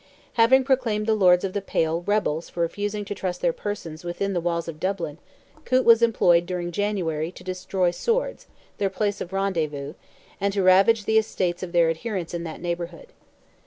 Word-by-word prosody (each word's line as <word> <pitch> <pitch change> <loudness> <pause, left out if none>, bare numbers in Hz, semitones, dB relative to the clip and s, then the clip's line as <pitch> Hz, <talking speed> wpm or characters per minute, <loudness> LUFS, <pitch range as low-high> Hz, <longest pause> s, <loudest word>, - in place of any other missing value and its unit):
Having 250 +3 +5
proclaimed 250 -6 +1
the 220 - +2
Lords 180 -4 +4
of 190 -1 -2
the 205 - -1
Pale 165 -3 0
rebels 180 -6 0
for 170 - -4
refusing 205 +4 -2
to 200 - -4
trust 185 -2 -4
their 170 -2 +1
persons 175 -6 -6
within 195 +3 -2
the 175 - 0
walls 170 0 -1
of 160 -2 -7
Dublin, 175 -4 -3 0.4
Coote 255 0 +2
was 230 0 +7
employed 175 -7 +4
during 175 -1 -3
January 170 -5 -1
to - - -13
destroy 185 0 -1
Swords, 480 - -2 0.3
their 195 - +1
place 205 +1 -2
of 180 - -5
rendezvous, 155 -7 -2 0.5
and 200 0 0
to 195 - +1
ravage 195 +4 +5
the 220 0 +4
estates 180 -4 -2
of 185 -2 -5
their 170 -2 +4
adherents 180 0 -4
in 170 -1 -3
that 160 - -7
neighbourhood. 175 - -5
185 Hz, 185 wpm, -24 LUFS, 170-205 Hz, 0.5 s, was